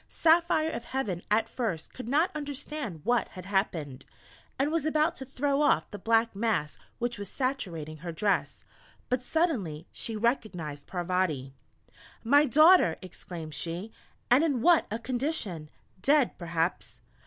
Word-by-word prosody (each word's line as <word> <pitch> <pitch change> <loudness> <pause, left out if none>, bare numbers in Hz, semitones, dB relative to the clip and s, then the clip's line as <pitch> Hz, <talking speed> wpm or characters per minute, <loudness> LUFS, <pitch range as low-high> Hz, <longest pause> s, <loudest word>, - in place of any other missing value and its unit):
Saphire 320 -1 +3
of 235 - -6
Heaven 210 -10 -2
at 220 +2 +2
first 215 -10 -4
could 250 -2 -7
not 310 +7 +3
understand 285 - -5
what 240 +3 +2
had 185 -3 -10
happened, 165 -9 -2 0.5
and 280 +3 +1
was 330 -2 0
about 310 0 +2
to 265 - -7
throw 280 +2 0
off 295 - +2
the 205 - -7
black 225 +1 +2
mass 205 -8 -1 0.2
which 240 -2 -2
was 200 -2 -5
saturating 175 - -3
her 170 +3 -6
dress, 200 +5 -1 0.5
but 250 0 +1
suddenly 245 - -1
she 225 - -3
recognized 200 - -2
Parvati: 175 -7 -1 0.7
"My 285 +6 +5
Daughter!" 310 - +6
exclaimed 170 -3 -8
she, 170 +8 -4 0.4
"and 260 +5 +6
in 275 -8 0
what 345 -2 +5
a 220 - -2
condition! 235 - -3 0.3
Dead, 280 +3 +3
perhaps!" 170 0 -2
225 Hz, 140 wpm, -29 LUFS, 175-280 Hz, 0.7 s, Daughter